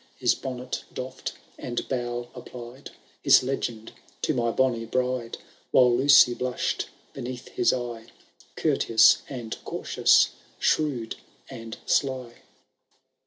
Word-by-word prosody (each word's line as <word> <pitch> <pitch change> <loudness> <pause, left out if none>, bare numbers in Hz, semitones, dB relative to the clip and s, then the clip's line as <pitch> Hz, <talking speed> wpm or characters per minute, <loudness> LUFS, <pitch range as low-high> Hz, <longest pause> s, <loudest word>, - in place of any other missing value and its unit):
His - - +3
bonnet 125 -1 -5
doiFM, 130 0 -5 0.3
and 120 -1 -4
bow, 120 -2 -3
applied 125 +2 -10 0.3
His - - +6
legend 120 -4 -3 0.3
to - - +1
my 120 -3 0
bonny 120 -1 +1
bride; 125 0 -2 0.3
While 125 -2 +5
Lucy 135 -1 +6
blush'd 125 0 -2 0.3
beneath 125 0 -7
his 120 - +2
eye. 120 -2 -4 0.5
Courteous 110 -1 +4
and 120 -5 -6
cautious, - - +3 0.3
shrewd 135 -8 0 0.3
and 115 -3 -8
sly. 130 -4 0
125 Hz, 110 wpm, -26 LUFS, 120-130 Hz, 0.5 s, His